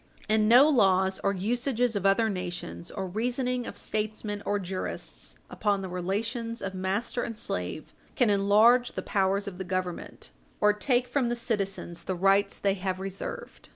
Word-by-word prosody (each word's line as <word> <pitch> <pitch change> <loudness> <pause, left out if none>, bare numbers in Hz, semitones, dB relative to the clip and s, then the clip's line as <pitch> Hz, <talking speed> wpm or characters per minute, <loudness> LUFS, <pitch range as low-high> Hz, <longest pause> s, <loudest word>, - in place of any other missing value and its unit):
And 215 0 +3
no 250 +5 +8
laws 190 -8 +3
or 200 - +3
usages 240 +4 0
of 200 -1 +1
other 195 +3 +3
nations, 175 - -5
or 190 - -4
reasoning 245 +5 -1
of - - -7
statesmen 215 -1 -3
or 205 - +2
jurists 185 -1 -5
upon 200 -2 0
the 190 - -5
relations 225 +6 -3
of 195 -2 -4
master 195 +6 -1
and 230 -2 -4
slave, 90 - -4 0.2
can 240 -5 +3
enlarge 215 +5 +5
the - - -4
powers 195 +1 +1
of 185 -2 -7
the - - -2
Government 185 -1 -4 0.3
or 210 0 +5
take 245 +3 +1
from 245 -1 0
the 240 - 0
citizens 195 -7 -3
the 185 - -1
rights 195 +2 +3
they 200 -1 +1
have 185 -1 -3
reserved. 195 0 -6
200 Hz, 165 wpm, -28 LUFS, 190-230 Hz, 0.3 s, no